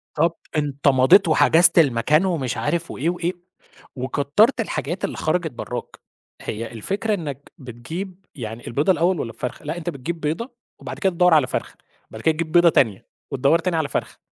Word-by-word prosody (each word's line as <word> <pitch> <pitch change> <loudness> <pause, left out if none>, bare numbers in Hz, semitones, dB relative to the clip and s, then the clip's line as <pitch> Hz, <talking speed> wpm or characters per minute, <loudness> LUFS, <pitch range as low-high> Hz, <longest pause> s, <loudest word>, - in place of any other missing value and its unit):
طَب 165 +2 +2 0.2
أنت 145 -2 -1
مضيت 130 +8 +6
وحجزت 165 +2 +5
المكان 150 +4 +3
ومش 155 -10 -1
عارف 170 -1 -2
وإيه 155 +6 -1
وإيه، 175 0 -2 0.6
وكتّرت 145 - +2
الحاجات - - -3
اللي - - -6
خَرَجِت 170 -3 -1
برّاك. 125 0 -7 0.4
هي 115 +2 -5
الفكرة 195 - -2
إنك 145 -7 -5
بتجيب 165 - -8
يعني 115 -2 -7
البيضة 145 +9 +2
الأول 175 0 +1
والّا 115 - -3
الفرخة؟ 125 +6 -6
لأ، 155 +3 -3
أنت 175 0 -4
بتجيب 165 +2 -5
بيضة 165 - -3 0.3
وبعد - - -7
كده 190 -2 +1
تدوَّر 180 0 +4
على 150 -5 +4
فرخة، - - -4 0.4
بعد 110 - -9
كده 160 - +3
تجيب 155 0 -4
بيضة 175 0 +6
تانية 110 -10 +1 0.2
وتدوَّر 140 +5 +3
تاني 170 0 -1
على 155 -3 -1
فرخة، - - -4
155 Hz, 170 wpm, -22 LUFS, 130-175 Hz, 0.6 s, مضيت